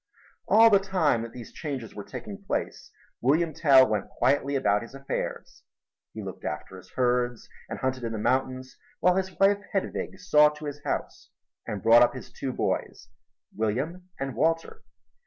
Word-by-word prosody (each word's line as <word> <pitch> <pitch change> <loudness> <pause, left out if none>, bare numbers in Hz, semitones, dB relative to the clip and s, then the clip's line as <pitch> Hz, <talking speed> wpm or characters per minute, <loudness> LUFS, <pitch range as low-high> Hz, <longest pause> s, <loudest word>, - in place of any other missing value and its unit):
All 225 +1 +7
the 200 - +6
time 180 - +1
that 115 0 -6
these 120 -2 -10
changes 135 -8 -5
were 105 - -7
taking 200 - -8
place, - - -3 0.3
William 155 +6 +2
Tell 135 -4 +6
went 105 -2 -2
quietly 140 +2 +1
about 105 -6 +2
his 115 +3 -10
affairs. 135 0 -5 0.5
He - - -5
looked - - -8
after - - -5
his 90 - -16
herds 125 -2 0 0.2
and - - -4
hunted 130 -1 -2
in 115 - -2
the - - -3
mountains, 130 +3 -1 0.2
while 180 +1 +4
his 190 -1 -2
wife, 200 +1 +4
Hedwig, 190 -1 -2
saw 150 -4 +5
to 150 0 -9
his 145 0 -6
house - - -4 0.4
and 100 -3 -4
brought 115 +1 +7
up 120 - +4
his 130 - -9
two 135 - -4
boys, - - -3 0.5
William 145 - -2
and 135 -1 -3
Walter. 165 +2 0
135 Hz, 170 wpm, -27 LUFS, 120-165 Hz, 0.5 s, All